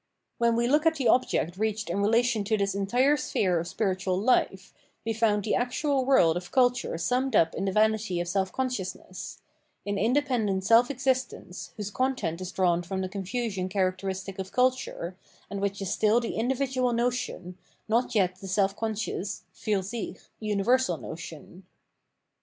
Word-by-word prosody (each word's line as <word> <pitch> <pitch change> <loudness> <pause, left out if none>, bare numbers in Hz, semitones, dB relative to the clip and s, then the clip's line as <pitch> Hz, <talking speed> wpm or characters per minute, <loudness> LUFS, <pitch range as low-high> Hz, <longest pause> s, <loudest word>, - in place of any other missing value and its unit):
When 235 -1 +3
we 235 +1 +2
look 300 +5 +3
at 320 - +3
the 270 -5 0
object 185 -8 +2
reached 215 0 -1
in 200 - -1
relation 230 +1 +2
to 220 +1 +1
this 200 -1 0
entire 245 +9 +2
sphere 185 - 0
of 170 - -4
spiritual 185 -2 -1
hfe, 195 -5 +1 0.3
we 225 - 0
found 215 -2 +2
the 215 - 0
actual 265 +2 0
world 175 -12 +5
of 175 0 -5
culture 245 -8 +2
summed 250 +7 0
up 165 -3 +4
in - - -2
the 195 - 0
vanity 215 -3 +2
of 175 - -2
self 190 +1 0
consciousness 190 -8 -4 0.2
— - - -45
in 200 0 -1
independent 225 -5 +1
self 230 +3 +6
existence, 260 -8 -2
whose 210 -1 -4
content 205 -10 -1
is 185 0 -5
drawn 175 -2 +2
from 190 +2 -4
the 185 - -3
confusion 195 0 -3
characteristic 190 0 -2
of 190 0 -5
culture, 250 -8 0 0.4
and 200 -1 -3
which 200 0 -1
is 190 - -3
still 220 +2 +3
the 235 - -3
individual 255 +1 0
notion, 235 -7 -2 0.3
not 230 +2 +1
yet 185 -3 +2
the 195 - -9
seh 195 +1 +2
conscious 215 -2 -3
(fiir 205 -3 -1
sick) 220 +4 -5 0.2
universal 215 -1 +1
notion. 165 +2 -9
210 Hz, 165 wpm, -27 LUFS, 190-245 Hz, 0.4 s, self